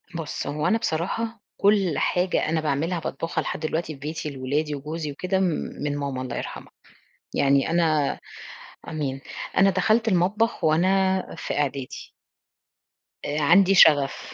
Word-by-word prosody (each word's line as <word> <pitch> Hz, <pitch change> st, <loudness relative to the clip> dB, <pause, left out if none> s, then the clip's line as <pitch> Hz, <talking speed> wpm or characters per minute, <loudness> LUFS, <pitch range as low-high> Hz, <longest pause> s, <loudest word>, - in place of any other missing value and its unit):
بُصّ، 165 Hz, -3 st, -4 dB
هو 150 Hz, +1 st, -1 dB
أنا 225 Hz, -, +3 dB
بصراحة 225 Hz, +5 st, -2 dB, 0.2 s
كُلّ 195 Hz, -5 st, +3 dB
حاجة 180 Hz, -3 st, +1 dB
أنا 160 Hz, 0 st, +1 dB
باعملها 155 Hz, +4 st, -1 dB
باطبخها 165 Hz, 0 st, -3 dB
لحد -, -, -4 dB
دلوقتي 160 Hz, 0 st, -2 dB
في 140 Hz, -, -13 dB
بيتي 150 Hz, +1 st, -4 dB
لولادي 145 Hz, +3 st, -2 dB
وجوزي 150 Hz, +2 st, -5 dB
وكده، 185 Hz, +6 st, -1 dB, 0.4 s
من 145 Hz, -1 st, -1 dB
ماما 140 Hz, -2 st, -3 dB
الله 130 Hz, -2 st, -5 dB
يرحمها، -, -, -7 dB, 0.6 s
يعني 140 Hz, +1 st, +3 dB
أنا- 160 Hz, -4 st, +1 dB, 0.7 s
آمين- 145 Hz, -4 st, -3 dB, 0.4 s
أنا 195 Hz, +1 st, +6 dB
دخلت 220 Hz, +4 st, +2 dB
المطبخ 195 Hz, +2 st, +1 dB
وأنا 190 Hz, +4 st, +3 dB, 0.2 s
في -, -, -3 dB
إعدادي. 140 Hz, -2 st, -3 dB, 1.1 s
آآ، 150 Hz, +1 st, -1 dB
عندي 190 Hz, +6 st, +5 dB
شغف. 145 Hz, -6 st, +4 dB
160 Hz, 135 wpm, -24 LUFS, 145-190 Hz, 1.1 s, أنا